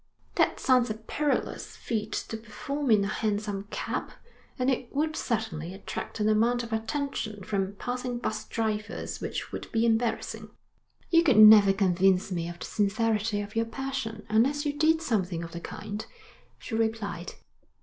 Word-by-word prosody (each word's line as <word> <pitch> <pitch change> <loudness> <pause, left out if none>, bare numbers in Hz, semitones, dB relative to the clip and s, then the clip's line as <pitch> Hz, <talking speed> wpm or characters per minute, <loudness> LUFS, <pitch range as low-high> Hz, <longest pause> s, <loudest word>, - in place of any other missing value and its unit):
'That - - +2
sounds 255 -3 +4
a 215 - -2
perilous 285 +7 -2
feat 220 -3 -3
to - - -3
perform 265 +6 -4
in 210 -3 +5
a - - 0
hansom 205 -1 -2
cab, - - -3 0.5
and 255 0 +2
it 245 -1 -2
would 310 +2 0
certainly 190 - -2
attract 195 - -6
an 210 - +2
amount 235 +3 +3
of 230 -1 -6
attention 220 -3 -3
from 195 0 -2
passing 245 +2 -3
bus 230 -2 -3
drivers 215 -1 -3
which - - -4
would - - -6
be 225 0 +2
embarrassing.' 230 0 0 0.6
'You 335 -1 +7
could 285 -10 +4
never 215 -2 +10
convince 190 0 +2
me 170 -2 -2
of 175 - -8
the - - -6
sincerity 210 0 +1
of 205 +1 -8
your 225 0 +2
passion 230 -3 -4
unless 270 +8 +2
you 290 - 0
did 320 +2 +3
something 185 - 0
of 165 - -7
the 170 - -6
kind,' 210 +3 -6 0.5
she - - -9
replied. 220 -6 -1
220 Hz, 160 wpm, -28 LUFS, 205-245 Hz, 0.6 s, never